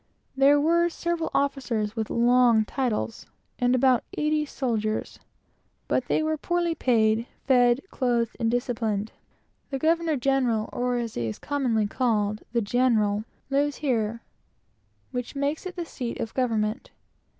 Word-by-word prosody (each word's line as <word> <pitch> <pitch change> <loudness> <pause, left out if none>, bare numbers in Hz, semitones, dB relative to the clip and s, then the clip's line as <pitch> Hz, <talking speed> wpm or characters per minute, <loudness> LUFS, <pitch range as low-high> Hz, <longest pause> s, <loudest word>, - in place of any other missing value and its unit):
There 275 +2 +5
were 340 +3 +3
several 340 -1 -2
officers 250 -6 -1
with 220 -2 -2
long 240 -2 +4
titles, 230 -3 -2 0.3
and 245 0 +3
about 255 -1 +3
eighty 300 0 +1
soldiers, 220 -6 -2 0.7
but - - 0
they - - +1
were 315 0 0
poorly 345 +1 0
paid, 230 -5 +2 0.2
fed, 245 -1 +4
clothed, 240 -3 0
and 230 -2 +1
disciplined. 225 -3 -1 0.6
The 270 - -2
governor 320 +1 +1
general, 250 -4 +1
or, 245 0 0
as 235 -2 -3
he 120 -1 -2
is 110 - -4
commonly 250 -7 0
called, 215 -2 0
the 235 0 +1
"general," 215 -2 +1 0.3
lives 285 +1 +1
here; 230 -5 -1 0.9
which 250 +1 -4
makes 285 +5 -1
it 365 - -8
the 345 -2 -4
seat 245 -7 -5
of 225 - -4
government. 225 -1 -1
245 Hz, 140 wpm, -26 LUFS, 225-280 Hz, 0.9 s, There